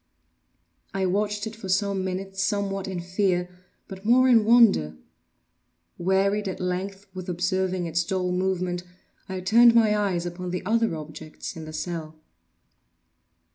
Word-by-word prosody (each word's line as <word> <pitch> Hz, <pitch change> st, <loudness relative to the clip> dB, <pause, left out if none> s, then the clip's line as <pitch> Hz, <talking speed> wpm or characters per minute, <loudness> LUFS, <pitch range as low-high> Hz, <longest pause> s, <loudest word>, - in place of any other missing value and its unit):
I 190 Hz, -1 st, +1 dB
watched 205 Hz, +3 st, -1 dB
it 220 Hz, 0 st, -6 dB
for 205 Hz, -4 st, -8 dB
some 195 Hz, 0 st, +1 dB
minutes, 195 Hz, +1 st, -3 dB
somewhat 200 Hz, -1 st, -1 dB
in 185 Hz, -2 st, -4 dB
fear, 180 Hz, 0 st, 0 dB, 0.4 s
but 190 Hz, 0 st, -10 dB
more 250 Hz, +4 st, +5 dB
in 235 Hz, -4 st, +6 dB
wonder. 215 Hz, -, +5 dB, 1.0 s
Wearied 195 Hz, +3 st, +1 dB
at 190 Hz, -, -4 dB
length 190 Hz, +2 st, -3 dB
with 185 Hz, -1 st, -7 dB
observing 185 Hz, 0 st, -1 dB
its 170 Hz, +1 st, 0 dB
dull 180 Hz, +1 st, -1 dB
movement, 180 Hz, -1 st, -1 dB, 0.5 s
I 190 Hz, -1 st, -4 dB
turned 230 Hz, +5 st, +6 dB
my 220 Hz, -2 st, +5 dB
eyes 190 Hz, -4 st, 0 dB
upon 175 Hz, +1 st, -5 dB
the 180 Hz, 0 st, -4 dB
other 225 Hz, -3 st, +1 dB
objects 155 Hz, 0 st, -8 dB
in 160 Hz, -1 st, -7 dB
the 155 Hz, -, -8 dB
cell. 160 Hz, -2 st, -5 dB
190 Hz, 140 wpm, -25 LUFS, 180-205 Hz, 1.0 s, in